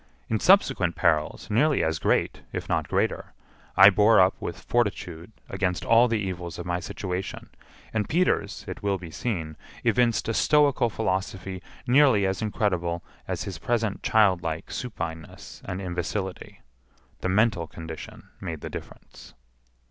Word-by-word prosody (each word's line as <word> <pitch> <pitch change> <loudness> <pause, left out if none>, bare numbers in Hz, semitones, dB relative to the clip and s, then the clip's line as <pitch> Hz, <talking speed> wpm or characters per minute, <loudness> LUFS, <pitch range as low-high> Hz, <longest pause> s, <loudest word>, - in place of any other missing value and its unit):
In 110 - +1
subsequent 100 - +4
perils, 80 -3 +1
nearly 145 +7 +3
as 80 -1 0
great, - - +1
if - - -5
not - - 0
greater, - - -1 0.4
I 100 +2 +10
bore 105 +3 +5
up 95 +1 +5
with - - -5
fortitude 95 -6 -2 0.2
against 90 -3 -2
all 115 +2 +6
the 115 -1 0
evils 90 -5 -4
of - - -6
my 90 0 -1
situation, 95 -1 -5 0.4
and 105 -2 -1
Peters, 180 +4 0
it - - -6
will 100 -1 0
be 85 -3 -10
seen, 80 -8 -3 0.3
evinced 120 -2 +2
a 115 - 0
stoical 140 -3 +3
philosophy 95 -3 -3 0.2
nearly 130 -5 +5
as 95 +2 -1
incredible 90 -6 -1 0.2
as - - -3
his 95 -4 -6
present 115 -2 -1
childlike 90 -7 +2
supineness 85 -9 -6
and 95 0 -4
imbecility—the 90 - -6
mental 100 -4 +2
condition 80 0 -9
made 80 -5 -5
the - - -6
difference. - - -11
95 Hz, 140 wpm, -26 LUFS, 85-110 Hz, 0.4 s, I